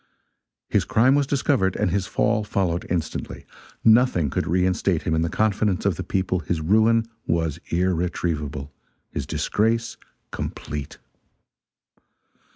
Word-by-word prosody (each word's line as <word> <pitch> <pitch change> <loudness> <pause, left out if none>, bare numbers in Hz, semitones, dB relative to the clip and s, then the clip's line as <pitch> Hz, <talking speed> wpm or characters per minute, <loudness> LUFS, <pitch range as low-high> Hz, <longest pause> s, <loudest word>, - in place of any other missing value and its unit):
His - - +2
crime 125 +4 +3
was 140 -1 +2
discovered, 130 -9 +1
and - - 0
his 95 0 0
fall 105 - +1
followed 90 -4 -1
instantly. 85 -3 -3 0.4
Nothing 110 - +4
could - - -1
reinstate 90 0 +1
him - - -1
in 80 - +2
the 85 - 0
confidence 105 -2 0
of 100 -4 +2
the - - -5
people, 95 -1 -1
his 85 -1 -2
ruin 110 +7 +3 0.2
was 80 -3 0
irretrievable 85 -5 -1 0.4
his - - -4
disgrace 115 +2 0 0.3
complete. 75 -2 -5
90 Hz, 125 wpm, -23 LUFS, 85-110 Hz, 0.4 s, Nothing